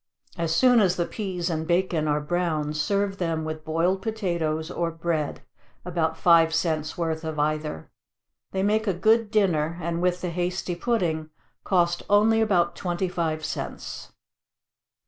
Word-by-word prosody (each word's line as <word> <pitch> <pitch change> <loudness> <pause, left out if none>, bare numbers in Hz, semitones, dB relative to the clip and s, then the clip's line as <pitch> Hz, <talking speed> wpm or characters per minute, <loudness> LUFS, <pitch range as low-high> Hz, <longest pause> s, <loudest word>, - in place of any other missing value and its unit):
As 165 -2 -1
soon 250 +3 +5
as 185 -4 +3
the 175 - 0
peas 185 -5 -4
and 160 -2 -2
bacon 175 -3 +1
are 150 0 +2
brown, 155 -1 -1
serve 195 +5 0
them 165 -3 -1
with 155 0 -5
boiled 170 +5 0
potatoes 170 -7 -2
or 170 -1 -1
bread, 165 -2 -2 0.4
(about 165 -2 -1
five 165 -1 +5
cents' 160 -1 -1
worth 165 -1 -2
of 160 -1 -4
either;) 150 - -2 0.6
they 190 0 -1
make 215 +2 +1
a 195 - +1
good 220 +4 +3
dinner, 170 -7 +1
and 170 0 -2
with 180 0 +1
the 180 - -2
hasty 180 +1 -2
pudding, 170 -6 -1 0.3
cost 175 -2 +2
only 215 +2 +4
about 180 -6 +2
twenty 180 +1 -2
five 160 -3 -2
cents. - - -6
170 Hz, 150 wpm, -25 LUFS, 160-190 Hz, 0.6 s, soon